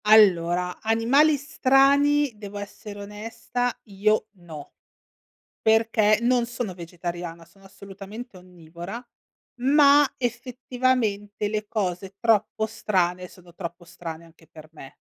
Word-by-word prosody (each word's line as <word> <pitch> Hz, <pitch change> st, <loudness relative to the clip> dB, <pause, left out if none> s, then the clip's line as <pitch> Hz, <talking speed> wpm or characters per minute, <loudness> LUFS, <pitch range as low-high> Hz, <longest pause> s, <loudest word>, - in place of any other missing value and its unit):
Allora, 180 Hz, -4 st, +4 dB
animali 250 Hz, +8 st, +3 dB
strani 280 Hz, 0 st, +3 dB
devo 205 Hz, -1 st, -9 dB
essere 205 Hz, 0 st, -8 dB
onesta, 225 Hz, +4 st, -3 dB, 0.2 s
io 215 Hz, +2 st, +1 dB
no, 160 Hz, -5 st, -11 dB, 0.9 s
perché 220 Hz, -1 st, +3 dB
non 245 Hz, 0 st, +3 dB
sono 235 Hz, -5 st, -5 dB
vegetariana, 170 Hz, -1 st, -7 dB
sono 195 Hz, +4 st, -23 dB
assolutamente 200 Hz, +4 st, -10 dB
onnivora, 180 Hz, +3 st, -9 dB, 0.6 s
ma 285 Hz, +2 st, +6 dB
effettivamente 245 Hz, -4 st, -1 dB
le 210 Hz, 0 st, -3 dB
cose 190 Hz, -2 st, -3 dB
troppo 220 Hz, -1 st, +1 dB
strane, 180 Hz, -4 st, -1 dB
sono 175 Hz, -2 st, -18 dB
troppo 175 Hz, -1 st, -7 dB
strane 165 Hz, -1 st, -8 dB
anche 165 Hz, -1 st, -21 dB
per 155 Hz, -1 st, -14 dB
me. 135 Hz, -4 st, -13 dB
210 Hz, 105 wpm, -25 LUFS, 180-240 Hz, 0.9 s, ma